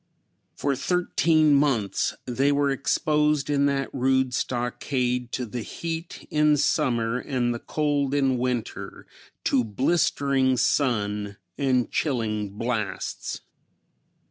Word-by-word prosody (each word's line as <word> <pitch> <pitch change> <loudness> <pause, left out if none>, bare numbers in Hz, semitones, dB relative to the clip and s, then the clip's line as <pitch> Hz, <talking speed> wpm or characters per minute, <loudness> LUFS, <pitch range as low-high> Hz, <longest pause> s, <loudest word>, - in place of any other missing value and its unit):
For 140 -1 0
thirteen 160 0 +2
months 135 -8 +1
they 135 +3 +1
were 140 0 +2
exposed 150 +1 +1
in 140 0 +3
that 135 -1 -1
rude 130 -1 +1
stockade 125 0 -1
to 125 - -2
the 120 +2 -5
heat 165 +7 -6
in 150 -1 +4
summer 125 -5 +1
and 125 -3 -1
the 120 - -5
cold 145 -1 0
in 135 -3 +2
winter, 125 -2 -3 0.4
to 130 -3 +2
blistering 135 - +1
sun 105 -6 0 0.2
and 130 -3 +1
chilling 110 -8 -1
blasts. 115 -4 -3
130 Hz, 110 wpm, -25 LUFS, 120-145 Hz, 0.4 s, in